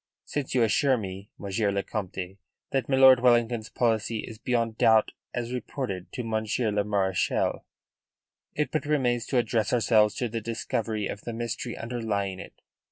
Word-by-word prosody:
Since 140 -3 -3
you 125 - +4
assure 130 +4 +3
me, 95 -1 -7
Monsieur 100 +1 -1
le 100 0 -1
Comte, 95 -2 -5 0.3
that 135 0 -1
milord 130 -1 +7
Wellington's 120 -2 +2
policy 115 -1 0
is 110 -2 -10
beyond 115 -3 -1
doubt, 110 -1 +5 0.2
as 120 0 -3
reported 125 -7 -4
to 125 - -3
Monsieur, 110 0 -1
le 105 0 +1
Marechal, 95 -3 0 0.9
it 150 - -1
but 150 -2 -2
remains 125 -6 +1
to 130 - 0
address 115 -2 +1
ourselves 110 -3 +4
to 125 - -1
the 115 0 -4
discovery 110 -1 -2
of 100 - -5
the 120 - -6
mystery 120 +1 -4
underlying 105 -5 -2
it. - - -12
115 Hz, 160 wpm, -27 LUFS, 105-120 Hz, 0.9 s, milord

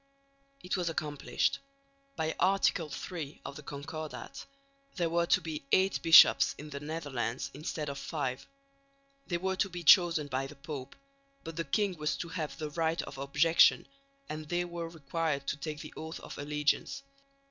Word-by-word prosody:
It 180 - -1
was 175 -2 0
accomplished. 150 -3 -1 0.6
By 160 0 -1
Article 185 -4 +2
III 155 -4 -6
of 140 - -6
the 150 - -8
Concordat, 150 +2 -7 0.5
there 170 -2 0
were 170 0 +2
to - - +4
be 155 -3 -5
eight 190 +1 +3
bishops 165 -1 +8
in 150 +1 -9
the 140 - -5
Netherlands 145 -6 -3
instead 150 +1 -4
of 140 -1 -4
five. 135 -3 -3 0.8
They 175 - 0
were 190 +2 -1
to 195 - +1
be 175 -1 -6
chosen 170 -2 +6
by 135 -1 -2
the 150 - -12
Pope, 140 -1 -7 0.5
but 165 -1 -7
the 165 - -1
king 195 +6 +1
was 150 0 0
to 170 - -5
have 165 -3 -4
the 155 -2 -4
right 165 +1 0
of 135 - -9
objection, 150 +4 +4 0.4
and 155 0 -6
they 175 0 0
were 170 -1 -5
required 160 -2 -2
to - - -1
take 150 0 -5
the - - -9
oath 160 +1 -6
of - - -9
allegiance. 150 - 0
155 Hz, 170 wpm, -31 LUFS, 145-170 Hz, 0.8 s, bishops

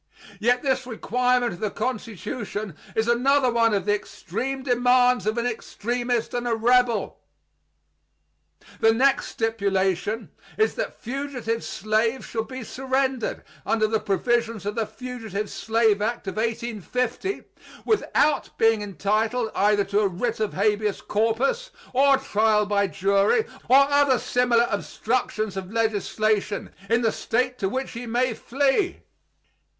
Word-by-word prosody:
Yet 245 +3 +2
this 260 -2 0
requirement 250 0 +1
of 175 - -10
the 215 - -1
Constitution 215 - -4 0.2
is 220 +1 +1
another 255 +2 +3
one 230 -1 +3
of 195 - -1
the 205 - +3
extreme 260 +6 -4
demands 245 -3 +3
of 215 +2 0
an 235 - 0
extremist 240 0 -2
and 245 0 -2
a 230 - +1
rebel. 245 +1 +2 1.6
The 225 0 +4
next 270 +3 +3
stipulation 200 -1 -1 0.3
is 435 - +2
that - - -4
fugitive 250 -3 -3
slaves 220 +4 -1
shall 225 -1 -3
be 255 +2 -7
surrendered 265 0 -1 0.2
under 220 -1 +1
the 220 0 +1
provisions 230 +1 0
of 205 - -1
the 225 -1 -1
Fugitive 225 -5 -6
Slave 225 -2 +1
Act 230 +2 -2
of 190 +1 -5
1850, 235 - -2 0.4
without 305 -8 +2
being 225 -1 +3
entitled 215 +4 -1
either 205 0 +3
to 200 +1 0
a 210 - +3
writ 220 +6 -2
of 215 -2 -1
habeas 210 +1 +1
corpus, 235 - 0 0.2
or 275 +1 +5
trial 215 -5 +2
by 200 -1 +1
jury, 200 - +2 0.2
or 260 - +8
other 285 -2 +4
similar 240 0 +2
obstructions 215 -1 -2
of 190 0 -6
legislation, 215 -2 0 0.2
in 230 +1 +2
the 225 - +3
State 250 +2 -1
to 195 - 0
which 260 +5 -3
he 240 +1 -7
may 245 +1 +1
flee. 280 - 0
230 Hz, 135 wpm, -24 LUFS, 210-250 Hz, 1.6 s, or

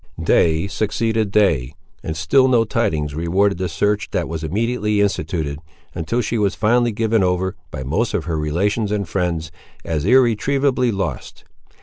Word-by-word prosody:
Day 80 +1 +3
succeeded 110 +1 -1
day, 80 -11 +1 0.3
and 80 +1 -5
still 105 - +3
no 120 -3 +4
tidings 80 -10 -1
rewarded 90 +5 +1
the 95 -1 -2
search 105 +5 0
that - - -2
was 80 -1 -5
immediately 105 +4 0
instituted, 80 -7 -1 0.3
until 100 +9 -1
she 115 0 -2
was 100 -2 +1
finally 120 +2 +2
given 110 -1 +1
over, 95 +1 0
by 65 - -6
most 105 - -1
of 85 -7 -2
her 80 -2 -2
relations 100 +8 0
and 100 -3 -1
friends, 85 -3 -2 0.3
as 80 -3 -2
irretrievably 130 - +2
lost. 95 - -4
100 Hz, 150 wpm, -20 LUFS, 80-110 Hz, 0.3 s, no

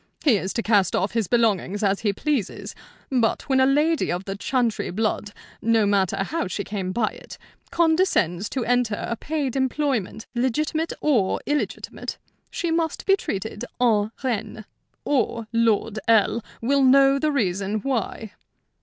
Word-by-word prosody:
He 265 -9 +5
is 190 0 -3
to 230 - -2
cast 205 -4 +3
off 195 - 0
his 225 -4 0
belongings 210 -2 +1
as 195 -1 +2
he 210 - +1
pleases; 260 0 -2 0.4
but 240 -4 +1
when 265 -2 +3
a 260 - +5
lady 300 +3 +2
of 180 +2 -3
the 195 - -4
Chantrey 235 +1 -1
blood 210 +2 -1 0.3
no 225 -1 +3
matter 195 -1 +1
how 315 - -2
she 200 +2 -3
came 195 -3 -4
by 215 +2 +1
it - - -12 0.3
condescends 320 - +2
to 255 -4 -2
enter 245 -3 +1
a 235 - -2
paid 285 0 -3
employment, 260 -6 -1
legitimate 305 +6 0
or 240 -11 +2
illegitimate, 295 0 -3 0.3
she 340 - -2
must 325 -1 -1
be 390 - +5
treated 210 - -5 0.2
en 220 -3 +2
reine, 220 -3 -3 0.4
or 240 -4 0
Lord 225 -2 +1
L. 225 0 +3 0.2
will 275 +4 +2
know 275 +1 +5
the 305 +2 +1
reason 200 -4 0
why. 225 -4 -3
230 Hz, 155 wpm, -24 LUFS, 205-275 Hz, 0.4 s, He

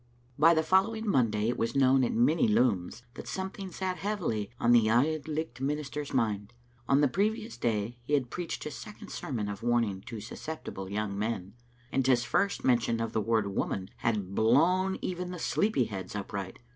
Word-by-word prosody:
By 165 +3 +7
the 160 - +2
following 210 +6 +2
Monday 115 - +2
it 120 - -2
was 115 +1 -1
known 135 -1 +5
at 120 - +1
many 140 +7 +3
looms 105 -1 +1
that - - -9
something 190 0 -5
sat 185 0 -3
heavily 165 - -2
on 120 - +3
the 115 -2 +5
Auld 145 +6 +2
Licht 155 -5 -4
minister's 145 +1 -3
mind. 110 -3 -1 0.4
On 140 +1 +5
the 145 - +5
previous 215 - -1
day 115 +1 -1
he 135 +5 -5
had 130 -5 +1
preached 175 -1 -4
his 150 - -5
second 210 0 -10
sermon 115 -7 -3
of 100 -1 -5
warning 115 -5 +1
to 115 -3 -5
susceptible 110 -4 -7
young 100 0 -2
men, 105 -3 -3 0.4
and 135 -1 +1
his 125 -2 +4
first 200 +11 0
mention 115 -2 +2
of 115 0 -2
the 110 - +1
word 110 -1 +1
" 100 - -5
woman" 95 0 -2
had 105 -4 -1
blown 170 - +3
even 180 0 -3
the 180 - -5
sleepy 200 - +1
heads 95 -3 -6
upright. 100 -2 -5
125 Hz, 185 wpm, -30 LUFS, 110-160 Hz, 0.4 s, By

